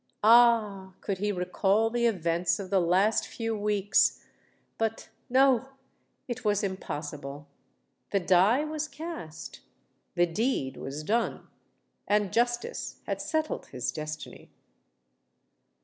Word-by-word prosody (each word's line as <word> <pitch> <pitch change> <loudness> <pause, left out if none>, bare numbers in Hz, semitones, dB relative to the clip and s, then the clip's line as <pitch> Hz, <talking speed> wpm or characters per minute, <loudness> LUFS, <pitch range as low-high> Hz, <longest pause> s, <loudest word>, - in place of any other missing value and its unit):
Ah! 215 -4 +5
could 195 -3 -3
he 205 +1 0
recall 195 +4 +1
the 240 0 +2
events 170 -4 +1
of 195 -2 -7
the 195 - +4
last 190 +6 +2
few 225 -1 -3
weeks!—But, 210 +2 -1 0.2
no—it 265 -1 -1
was 205 -2 +1
impossible:—the 145 -1 -6
die 190 - +4
was 310 0 -3
cast—the 175 - -6
deed 170 - -1
was 145 +3 -6
done—and 210 -1 -3
justice 240 +1 -1
had - - -3
settled 315 -1 -2
his 125 -1 -3
destiny! 155 -1 -7
205 Hz, 95 wpm, -28 LUFS, 175-235 Hz, 0.2 s, Ah